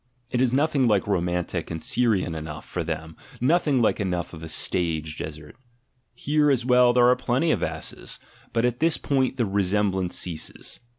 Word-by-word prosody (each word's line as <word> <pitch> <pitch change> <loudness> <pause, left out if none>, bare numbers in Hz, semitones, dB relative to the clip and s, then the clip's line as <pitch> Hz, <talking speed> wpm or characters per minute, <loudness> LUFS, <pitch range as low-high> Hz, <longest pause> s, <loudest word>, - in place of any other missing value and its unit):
It 125 - +1
is 130 -2 +3
nothing 140 -1 +2
like 105 -4 +2
romantic 90 -3 -1
and 80 - -4
Syrian 110 -5 +1
enough 75 -1 -7
for 85 - -3
them, 80 0 -5 0.2
nothing 140 -2 +2
like - - +2
enough 90 -4 -2
of 80 - -9
a 80 - -7
stage 80 -3 -1
desert! 75 +1 -8 0.6
Here 150 +1 +2
as 130 -4 +1
well 125 -1 +5
there 120 0 +5
are 125 - +5
plenty 125 +5 +1
of - - 0
asses, - - -5 0.3
but 115 0 +1
at 125 0 -1
this 165 0 +2
point 130 -2 0
the 120 - +1
resemblance 95 -2 0
ceases. 85 -4 -6
105 Hz, 175 wpm, -25 LUFS, 85-125 Hz, 0.6 s, well